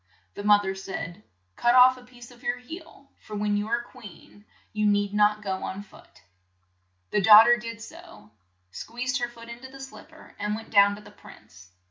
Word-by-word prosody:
The 205 - -8
moth 205 0 +4
er 190 - -2
said; 190 -1 -7 0.3
"Cut 240 +1 +2
off 255 0 +7
a 255 - -15
piece 245 -1 -15
of 245 0 -18
your 245 - -2
heel, 280 +2 -12
for 215 - -10
when 205 0 -1
you 205 +1 -2
are 235 +1 -1
queen 210 -4 -15 0.3
you 210 0 0
need 205 0 +1
not 210 0 +2
go 190 -2 -3
on 195 +2 -5
foot." 205 - -20 0.9
The 210 - +1
daugh 215 +2 +9
ter 240 +1 +4
did 230 -1 -8
so, 335 - -14 0.4
squeezed 245 - -4
her 240 0 -2
foot 230 -1 -14
in 235 0 -9
to 260 +1 -11
the 270 +1 -13
slip 270 +3 -11
per, 315 0 -17
and 210 +1 -2
went 225 +1 -10
down 200 -1 +5
to 210 - -13
the 210 - -15
prince. 90 - -17
215 Hz, 205 wpm, -26 LUFS, 205-245 Hz, 0.9 s, daugh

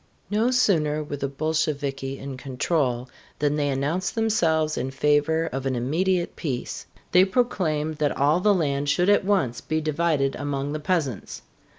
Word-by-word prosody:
No 220 +4 +2
sooner 155 -12 +2
were 145 -1 -5
the 140 - -2
Bolsheviki 140 -2 -2
in 135 -1 -6
control 130 -1 -1 0.3
than 145 0 +1
they 145 -1 0
announced 150 +8 -1
themselves 165 -9 +1
in 130 - -2
favor 150 +4 +2
of 135 0 -2
an 130 - 0
immediate 170 +9 0
peace. 130 -6 -4 0.2
They 180 +1 +7
proclaimed 170 -8 0
that 145 -2 0
all 145 +5 +3
the 210 +3 +3
land 145 -4 0
should 180 +6 +2
at 205 - +4
once 180 - 0
be 155 0 -1
divided 155 -3 0
among 145 0 -3
the 155 - -3
peasants. 150 - -2
150 Hz, 160 wpm, -25 LUFS, 140-175 Hz, 0.3 s, They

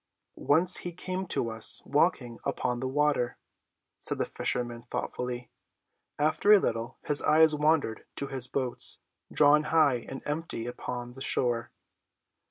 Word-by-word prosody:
"Once 175 +5 +4
he 175 - -4
came 185 +2 -5
to 115 -8 -1
us 110 0 +4
walking 135 -5 +1
upon 125 -1 -2
the 130 - -2
water," 145 -3 0 0.6
said - - -2
the - - 0
fisherman 120 -1 -3
thoughtfully. 125 0 -4 0.7
After 155 +7 +2
a 210 - +10
little 115 -7 -3
his 145 -1 +2
eyes 160 0 +5
wandered 150 -6 0
to 140 - -3
his 130 -2 -3
boats, 130 -2 -2 0.3
drawn 150 +1 +4
high 150 -6 +3
and 135 - -7
empty 150 -6 -4
upon 120 0 -6
the 135 - -12
shore. 120 -3 0
135 Hz, 140 wpm, -28 LUFS, 120-155 Hz, 0.7 s, a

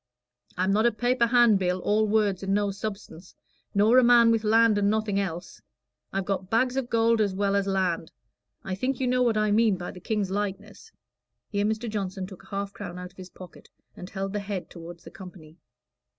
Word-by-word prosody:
I'm 185 +2 +1
not 220 +3 +3
a - - +2
paper 245 +2 +1
handbill 215 -7 +3
all 215 +3 +1
words 205 -3 +1
and 195 0 0
no 205 -1 0
substance 195 -3 -8 0.4
nor 220 +5 +5
a - - +4
man 235 -1 +6
with 225 -1 +1
land 220 0 +4
and 200 0 +2
nothing 215 -2 0
else; 175 -3 -5 0.5
I've 195 -1 -2
got 190 -1 -3
bags 250 +4 +1
of 265 -2 -2
gold 230 0 +2
as 200 -3 0
well 200 0 0
as 200 0 0
land.' 185 -4 -1 0.5
I 190 - -4
think 255 +8 -2
you 260 - 0
know 250 0 +1
what 235 -3 +2
I 215 0 +1
mean 215 -2 +3
by 175 0 -6
the 180 - -12
King's 205 0 -2
likeness." 205 - -5 0.6
Here 205 -1 -1
Mr. 220 +2 -2
Johnson 195 -3 -4
took 190 -1 -12
a - - -19
half 200 0 -4
crown 180 -4 -8
out 180 0 -8
of 190 - -31
his 185 -1 -10
pocket 185 -2 -14 0.3
and 180 - -9
held 195 0 -4
the 210 - -1
head 200 -2 -6
toward 170 0 -10
the 165 - -13
company. 175 -3 -13
200 Hz, 210 wpm, -26 LUFS, 190-220 Hz, 0.6 s, man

